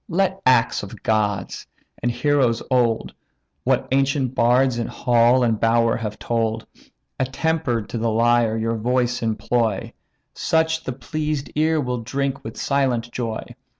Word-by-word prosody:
let 190 +2 0
acts 125 -2 +3
of 100 - -10
gods, 105 -3 -1 0.3
and 120 - +1
heroes 125 -2 +1
old, 120 -3 +1 0.5
What 130 0 +1
ancient 135 -1 +1
bards 125 0 +3
in 115 - -2
hall 120 0 +3
and 115 -3 +1
bower 115 0 +3
have 105 -2 -5
told, 115 -1 -1 0.5
Attemper'd 130 -3 -1
to 120 - -3
the 115 +1 0
lyre, 115 0 +2
your 115 +1 -1
voice 125 +1 0
employ; 110 -1 -1 0.4
Such 160 0 0
the 130 - -3
pleased 150 +2 -3
ear 155 +1 +2
will 125 -3 -2
drink 135 +3 -3
with 110 - -8
silent 130 -4 0
joy. 115 -3 -3
120 Hz, 140 wpm, -22 LUFS, 115-135 Hz, 0.5 s, acts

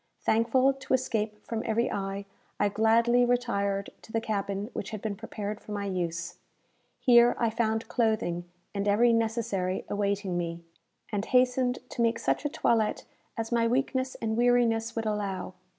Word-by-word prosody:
Thankful 245 +4 +3
to 265 -1 0
escape 220 -4 -2
from 225 -1 -3
every 230 +1 0
eye, 195 0 -3 0.3
I 205 - +3
gladly 230 +3 +4
retired 200 -5 0
to - - -14
the 225 - +1
cabin 200 0 -3
which 200 - -4
had 215 - -5
been 210 0 -3
prepared 210 0 -5
for 210 - -8
my 200 -1 -2
use. 170 -3 -3 0.6
Here 240 -1 +6
I 230 -2 +1
found 225 0 0
clothing 220 -7 0 0.3
and 200 0 -2
every 230 +4 +4
necessary 220 -5 -1
awaiting 200 -3 -1
me, 170 0 -4 0.5
and 205 0 -1
hastened 250 0 +2
to - - -3
make 230 0 +2
such 230 - -1
a - - +2
toilette 225 -6 +1 0.3
as 225 0 -3
my 230 -1 +3
weakness 260 +1 0
and 220 -1 -2
weariness 235 -1 +2
would 225 -1 -2
allow. 200 -4 -2
220 Hz, 160 wpm, -28 LUFS, 200-235 Hz, 0.6 s, Here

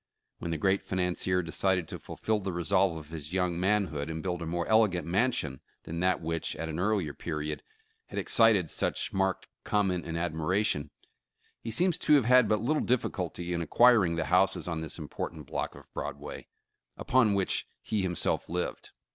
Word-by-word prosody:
When 85 - -4
the 80 - -1
great 95 +5 +2
financier 90 0 0
decided 90 +1 0
to - - -6
fulfill 110 -1 -2
the 95 -1 -3
resolve 85 +1 +1
of 75 -1 -10
his 80 0 -7
young 90 -2 0
manhood, 90 -7 0
and 80 0 -4
build 90 -2 -2
a 85 - -4
more 85 +1 -1
elegant 105 -7 +3
mansion 90 - 0 0.2
than 85 +1 -5
that 90 +1 +2
which, 80 0 -2
at 80 - -4
an 80 +1 -4
earlier 95 -6 0
period, 75 -2 -4 0.5
had - - -8
excited 110 -7 +4
such - - -2
marked 95 -1 0 0.2
comment 95 -5 0
and 85 0 -3
admira 85 +4 0
tion, 75 -7 -1 0.7
he 115 - -6
seems 175 +8 +2
to 150 - +5
have 135 -6 +4
had 125 -2 +5
but 105 -1 +2
little 150 +6 +1
difficulty 90 -7 -1
in 85 - -1
acquir 120 +6 +5
ing 85 -2 0
the 85 - -1
houses 90 +1 +3
on 80 -2 -2
this 80 - -4
important 80 -3 -6
block - - -3
of - - -13
Broadway, - - -6 0.5
upon 115 -6 +3
which 95 -2 0 0.2
he 105 -2 -1
himself 90 -3 -1
lived. 90 +1 -3
90 Hz, 180 wpm, -29 LUFS, 80-105 Hz, 0.7 s, to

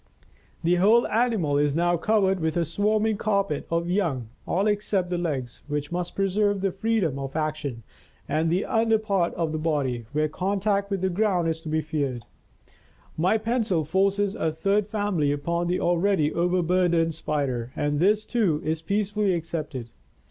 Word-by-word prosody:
The 175 +2 +3
whole 215 +6 +5
animal 210 -11 +1
is 145 -1 +1
now 175 +1 +2
covered 190 +1 +2
with 160 0 -1
a 170 - +1
swarming 210 +5 +1
carpet 200 -8 -1
of 170 +1 0
young, 165 - -1 0.2
all 195 +3 +1
except 205 -3 0
the 175 - 0
legs, 135 -8 -3
which 145 0 -3
must 175 0 -3
preserve 200 +1 +1
their 195 -1 +1
freedom 195 -7 0
of 135 0 -6
action, 155 -6 -3 0.4
and 155 +3 +1
the 180 +4 +1
under 225 0 +2
part 200 -5 0
of 165 -2 -1
the 155 - -2
body, 135 -7 -1
where 155 +1 +1
contact 200 +4 -1
with 195 -3 -2
the 190 - +1
ground 185 -3 +1
is 160 0 -3
to 160 - -7
be 155 +1 +1
feared. 140 -6 -3 0.9
My 180 +7 +2
pencil 220 -6 0
forces 195 +4 +1
a 160 - -1
third 195 +6 0
family 205 -9 0
upon 170 +4 -1
the 180 +1 0
already 175 -3 +2
overburdened 175 -1 +2
Spider, 135 -6 -2
and 145 0 0
this, 210 +5 +3
too, 200 -11 +1
is 160 +1 -1
peacefully 205 +1 0
accepted. 155 -8 -5
175 Hz, 165 wpm, -25 LUFS, 155-200 Hz, 0.9 s, whole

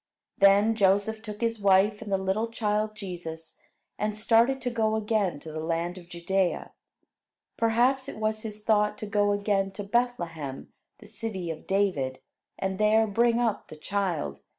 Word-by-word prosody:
Then 200 +3 +5
Joseph 205 +1 +2
took 210 -1 -8
his 230 -1 0
wife 200 +2 +4
and 210 -3 -7
the 195 - +3
little 190 +4 -1
child 215 -1 -1
Jesus, 175 -5 -7 0.4
and 210 0 -1
started 230 +4 +3
to 245 0 -2
go 220 -2 +1
again 210 -7 0
to 160 - -8
the 155 - -5
land 170 +3 -2
of 175 -1 -16
Judea. 180 +1 -1 0.8
Perhaps 250 +4 +2
it - - -8
was 215 0 -1
his 215 -1 -6
thought 210 -1 +2
to - - -5
go 205 0 +1
again 200 -1 +1
to 205 - -5
Bethlehem, 175 - -2 0.2
the 215 - -15
city 205 -5 -4
of 160 - -9
David, 180 -10 0 0.4
and 190 0 -3
there 215 +1 +4
bring 235 +3 +2
up 230 -3 -1
the - - -10
child. 170 - -2
205 Hz, 165 wpm, -27 LUFS, 190-220 Hz, 0.8 s, Then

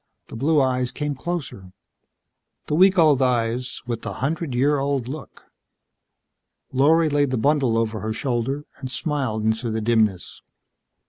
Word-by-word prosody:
The - - -9
blue 150 +6 +2
eyes 125 -2 +1
came 150 -1 -3
closer. 135 - -6 0.9
The - - -3
week 190 +4 +5
old 150 -5 +5
eyes 125 0 0
with 120 -2 -4
the - - -5
hundred 150 -1 -2
year 140 +3 +2
old 135 -3 -1
look. 145 +2 -9 1.3
Lorry 155 +5 +4
laid 145 -2 +1
the 130 - -1
bundle 135 -2 +2
over 115 -1 -1
her 110 +1 -3
shoulder 130 +4 -2
and 130 -2 -6
smiled 130 -7 -2
into 110 +2 0
the 110 0 -2
dimness. 110 -5 0
130 Hz, 145 wpm, -23 LUFS, 115-145 Hz, 1.3 s, week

